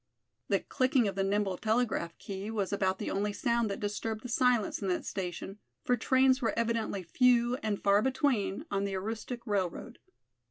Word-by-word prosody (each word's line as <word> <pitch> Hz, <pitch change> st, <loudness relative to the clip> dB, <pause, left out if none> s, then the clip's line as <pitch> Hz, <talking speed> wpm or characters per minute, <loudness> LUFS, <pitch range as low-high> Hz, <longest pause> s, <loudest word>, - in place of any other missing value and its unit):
The -, -, +2 dB
clicking 255 Hz, -3 st, +2 dB
of 195 Hz, -, -1 dB
the 195 Hz, 0 st, 0 dB
nimble 195 Hz, -1 st, 0 dB
telegraph 220 Hz, -7 st, 0 dB
key 195 Hz, +1 st, -6 dB
was 205 Hz, -3 st, -2 dB
about 190 Hz, -1 st, +1 dB
the -, -, -4 dB
only 205 Hz, +1 st, -1 dB
sound 235 Hz, -1 st, +1 dB
that 200 Hz, -, -4 dB
disturbed 215 Hz, +1 st, -3 dB
the 250 Hz, -, -6 dB
silence 245 Hz, -3 st, +2 dB
in 195 Hz, -, -2 dB
that 180 Hz, -1 st, -1 dB
station, 190 Hz, +2 st, -5 dB, 0.2 s
for 250 Hz, -, +2 dB
trains 260 Hz, +2 st, +3 dB
were 230 Hz, -, 0 dB
evidently 230 Hz, -4 st, -1 dB
few 245 Hz, +5 st, +3 dB
and 215 Hz, -5 st, -2 dB
far 200 Hz, +1 st, +5 dB
between 255 Hz, -7 st, 0 dB
on 200 Hz, 0 st, 0 dB
the 200 Hz, -1 st, -2 dB
Aroostook 225 Hz, +4 st, -4 dB
railroad. 195 Hz, -6 st, -2 dB
210 Hz, 175 wpm, -31 LUFS, 195-240 Hz, 0.2 s, far